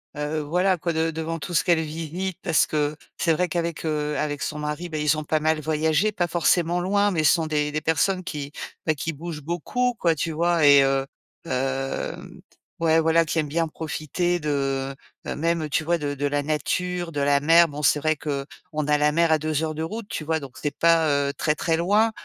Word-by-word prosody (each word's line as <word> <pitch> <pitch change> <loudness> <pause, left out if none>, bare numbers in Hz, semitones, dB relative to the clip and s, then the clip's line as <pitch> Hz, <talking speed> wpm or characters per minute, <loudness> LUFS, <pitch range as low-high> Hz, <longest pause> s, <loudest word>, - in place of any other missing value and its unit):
heu, 150 +1 -2
voilà 180 +5 +1
quoi, 170 0 -2
de 160 +1 0
devant 160 +1 -3
tout 175 - -6
ce - - +2
qu'elle 170 -2 +3
visite. 165 +4 -4
Parce 165 -4 +3
que 150 0 -1 0.2
c'est 165 - +2
vrai 180 +3 0
qu'avec, 170 0 -2
heu, 150 -2 -1
avec 145 -2 -2
son 150 - -3
mari, 150 +4 -3
bah, 155 -2 -5
ils 150 0 +2
ont 155 - -4
pas 155 0 0
mal 155 0 +1
voyagé, 160 +6 +1
pas 175 -2 0
forcément 175 +1 +2
loin, 200 +3 +2
mais 155 -3 0
ce - - +6
sont 165 -3 0
des 150 -1 -1
des 155 - -1
personnes 180 +5 +1
qui, 145 -4 -6 0.3
bah, 155 - +3
qui 165 +3 -3
bougent 160 0 -7
beaucoup 235 - -1
quoi, 165 -2 +2
tu 160 +2 -2
vois 170 0 +2
et 140 -1 +8
heu, 135 0 +1 0.4
hem, 135 -1 -3 0.4
ouais 165 -1 +3
voilà, 165 +1 +3
qui 160 +1 -1
aiment 150 - -1
bien 165 +2 0
profiter 160 +3 -2
de, 135 -2 -1 0.3
heu, - - -3
même, 165 0 0
tu 155 +1 0
vois, 170 +2 +1
de 145 -3 -3
de 145 +1 -3
la 145 0 -1
nature, 175 +4 -2
de 145 - -3
la 140 0 +3
mer. 165 +3 +6
Bon, 150 -1 -7
c'est 150 - +4
vrai 155 +1 +1
qu'on 150 +2 -5
a 150 0 +3
la 150 0 +3
mer 165 +1 +2
à - - +4
2 155 0 -1
heures 155 -1 -2
de 160 - -3
route, 215 +6 -5
tu 155 - -4
vois, 160 +1 0
donc 135 -3 -10
c'est 145 -2 -3
pas, 165 -1 +4 0.2
heu, 140 - -4
très, 150 +2 0
très 165 0 0
loin, 205 +7 +3
155 Hz, 225 wpm, -24 LUFS, 150-170 Hz, 0.4 s, et